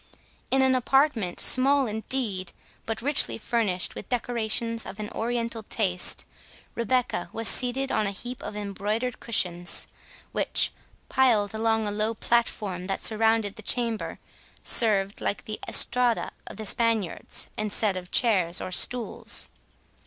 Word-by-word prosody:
In 265 0 +3
an 260 0 +4
apartment, 255 -7 +1
small 275 +2 +5
indeed, 215 -4 -2 0.3
but 225 0 -4
richly 285 +1 +4
furnished 215 -5 -1
with - - -9
decorations 230 -1 -1
of 200 - -9
an 210 -1 -5
Oriental 235 0 -2
taste, 190 -4 +1 0.5
Rebecca 245 +2 -1
was 225 -1 -1
seated 260 +4 +1
on 215 -1 +1
a - - 0
heap 245 +5 -7
of - - -7
embroidered 210 +4 -3
cushions, 180 -5 +1 0.5
which, - - +1 0.4
piled 220 -6 +2
along 225 0 0
a - - -1
low 215 +2 -1
platform 205 -6 -1
that 195 - -3
surrounded 220 -2 +1
the - - -7
chamber, 230 0 -2 0.5
served, 200 -3 +3
like 205 - -2
the 215 - -5
estrada 245 -1 +3 0.2
of - - -9
the 220 - -6
Spaniards, 225 -4 0
instead 210 -1 -1
of 180 -1 -7
chairs 190 -8 +2
and 185 - -5
stools. 240 +2 +1
225 Hz, 135 wpm, -26 LUFS, 205-240 Hz, 0.5 s, small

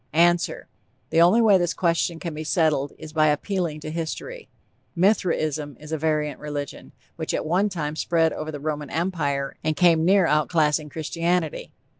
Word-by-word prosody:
_) - - -41
ANSWER: 170 +1 +2 0.4
The 165 - +4
only 200 +8 +5
way 205 -4 +5
this 175 -1 -1
question 170 -1 0
can 170 -1 -5
be 155 +1 -5
settled 155 -3 +1
is 155 - -10
by 155 -1 +3
appealing 155 0 -1
to 155 - -6
history. 170 - -5 0.5
Mithraism 155 - 0
is 150 +1 -11
a 160 - 0
variant 150 -1 -1
religion, 145 -2 -6 0.3
which - - -2
at - - -3
one 185 +6 +1
time 155 -5 -4
spread 165 0 +1
over 155 0 -5
the 145 - -6
Roman 150 -1 -4
Empire 150 -5 -2
and 155 0 0
came 170 -2 +4
near 190 +1 +4
outclassing 150 0 +1
Christianity. 165 +2 -2
160 Hz, 170 wpm, -24 LUFS, 150-175 Hz, 0.5 s, only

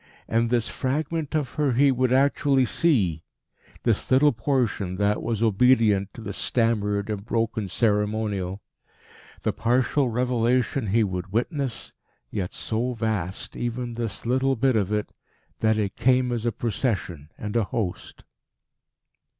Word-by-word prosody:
And 115 +1 +1
this 120 -2 +1
fragment 155 +3 -2
of 150 -4 0
her 145 -4 0
he 140 +3 +4
would 130 -1 +1
actually 135 0 +3
see 110 - +1 0.6
this - - 0
little 140 +3 +5
portion 115 -6 -1
that 105 +2 +1
was 115 -1 -1
obedient 110 -3 +3
to - - -8
the 100 -2 -5
stammered 105 -3 0
and 100 -2 -4
broken 115 -2 -1
ceremonial. 105 -2 0 0.8
The - - 0
partial 125 +3 +1
revelation 125 +1 +1
he 110 +4 +3
would 95 -1 -3
witness 130 - -2 0.4
yet 95 -4 -3
so 120 +3 -2
vast, 105 -5 -3
even 120 0 -3
this 115 -3 -4
little 130 +2 +2
bit 130 +1 +2
of 100 -2 +1
it, 105 -1 -1 0.5
that 110 -1 +2
it 100 -2 -1
came 125 -1 +2
as 120 -1 -1
a - - +2
Procession 100 - -2
and 105 0 -5
a 115 -3 +2
host. 95 -4 -4
115 Hz, 140 wpm, -25 LUFS, 105-130 Hz, 0.8 s, little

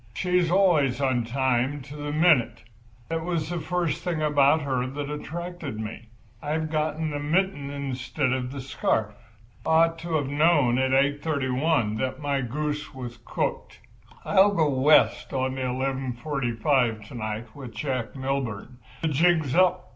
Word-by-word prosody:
She's 180 -2 +1
always 170 -9 +3
on 130 -4 +1
time, 130 +2 0
to 140 +2 -10
the 145 0 -4
minute. 155 -5 +3 0.5
That 165 0 -2
was 165 -3 -2
the 175 - -2
first 170 -1 -2
thing 175 -3 -1
about 150 0 +3
her 130 -2 -1
that 145 +2 -5
attracted 165 -4 -6
me. 110 +1 -6 0.3
I've 155 +1 -2
got 155 -1 0
the 155 -2 -2
mitten 155 -1 0
instead 140 -1 -2
of 125 -1 -2
the 140 0 -6
scarf. 110 -4 -1 0.5
I - - -3
ought 165 +1 +4
to 165 0 -3
have 145 -3 +1
known 145 -4 +3
at 130 0 +2
8.31 140 -3 +1
that 130 +1 -2
my 140 -2 -1
goose 150 +3 -3
was 120 -3 -7
cooked. - - -3 0.5
I'll 200 +1 +4
go 155 -4 +3
West 140 +3 +3
on 130 -1 0
the 130 - -4
11.45 130 -2 -1
to - - -11
night 110 0 -5
with 135 -4 -8
Jack 130 -5 -3
Milburn. 130 -3 -3 0.2
The - - +2
jig's 160 -2 +2
up. 180 0 +3
140 Hz, 155 wpm, -26 LUFS, 130-160 Hz, 0.5 s, ought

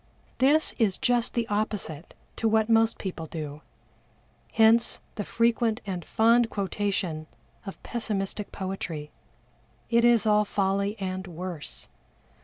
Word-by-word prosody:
This 290 +4 +4
is 205 -5 +2
just 245 -1 +1
the 235 -1 0
opposite 205 -7 -3 0.2
to 225 - +1
what 220 0 +2
most 225 0 +4
people 175 -4 -5
do, 150 -2 -6 0.9
hence 225 +1 +4
the 205 - -4
frequent 230 0 +1
and 185 -3 -4
fond 230 +5 +3
quotation 190 -6 -2 0.4
of 195 - -8
pessimistic 210 -3 -3
poetry. 185 -6 -5 0.8
It 235 0 +4
is 240 -2 +5
all 210 -1 +4
folly, 200 0 0
and 185 0 -4
worse. 170 - -6
205 Hz, 120 wpm, -27 LUFS, 185-225 Hz, 0.9 s, is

